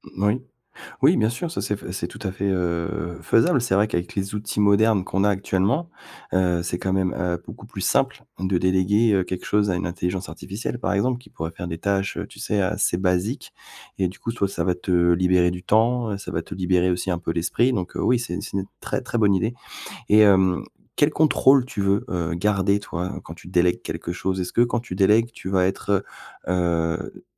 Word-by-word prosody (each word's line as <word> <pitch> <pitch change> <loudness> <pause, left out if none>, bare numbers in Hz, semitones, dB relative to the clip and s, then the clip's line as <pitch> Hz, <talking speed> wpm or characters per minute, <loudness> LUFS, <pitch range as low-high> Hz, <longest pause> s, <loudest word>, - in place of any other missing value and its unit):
Moui. 105 +6 +1 0.6
Oui, - - +6
bien 110 - +2
sûr 140 +9 -4
ça 165 - -4
c'est 105 - -2
f 95 - -9
c'est 95 - -3
tout - - -12
à 95 - -2
fait, 95 +1 -4
heu, 85 -1 -2
faisable. 135 +3 +3
C'est 120 -5 0
vrai 100 +2 +3
qu'avec 85 -3 -3
les 100 +1 -2
outils 105 0 -3
modernes 105 0 +4
qu'on 95 +1 0
a 105 - +4
actuellement, 100 - 0 0.4
heu, 90 -2 +2
c'est 90 - -3
quand 95 - -2
même, 95 -1 +1
heu, 90 -2 -1
beaucoup - - -10
plus - - -8
simple - - +1 0.2
de 95 0 0
déléguer, 95 +5 +3
heu, 95 -2 +3
quelque 90 0 -5
chose 105 -1 +2
à - - 0
une 90 0 -2
intelligence 90 +2 -3
artificielle, 100 +8 -5
par - - -1
exemple 120 +5 +1
qui 125 - -18
pourrait 80 +1 -5
faire 90 +1 -7
des 80 - -4
tâches, 100 +2 -1
heu, - - -4
tu - - -15
sais 105 - -1
assez 100 -2 +1
basiques. 95 +7 -1 0.4
Et 95 - +1
du 95 - -14
coup, 115 - -3
toi, 100 -4 0
ça 100 - -3
va 90 -2 +1
te 90 +1 -5 0.2
libérer 90 0 +3
du 90 0 -7
temps, 115 +1 +2
heu, 100 - -2
ça 100 - -7
va - - -1
te - - -9
libérer 90 0 +1
aussi 90 +2 -2
un 85 - 0
peu 85 -1 -3
l'esprit 90 +9 +1
donc, 95 -7 -3
heu, - - -2
oui, 125 0 +3
c'est 120 -6 -5
une - - -3
c'est - - -4
une 95 - -2 0.2
très, - - -2
très - - -3
bonne 105 -3 +4
idée. 110 +5 0 0.6
Et 105 +1 +6
hem, 95 -3 +4 0.3
quel 145 - +4
contrôle 140 -4 +4
tu 105 - -3
veux, 100 +1 +2
heu, 85 -2 -2
garder 100 +2 +1
toi 90 -1 -5
quand 80 - -9
tu 85 - -13
délègues 90 -1 +2
quelque 85 - -4
chose? 95 +1 -2
Est-ce 90 - -3
que 120 - +5
quand 120 0 +1
tu 115 -6 -7
délègues 105 +5 +4
tu 95 - -7
vas 95 -1 +3
être, 100 +1 0 0.4
heu - - +2 0.6
heu, - - -16
95 Hz, 230 wpm, -23 LUFS, 90-105 Hz, 0.6 s, Oui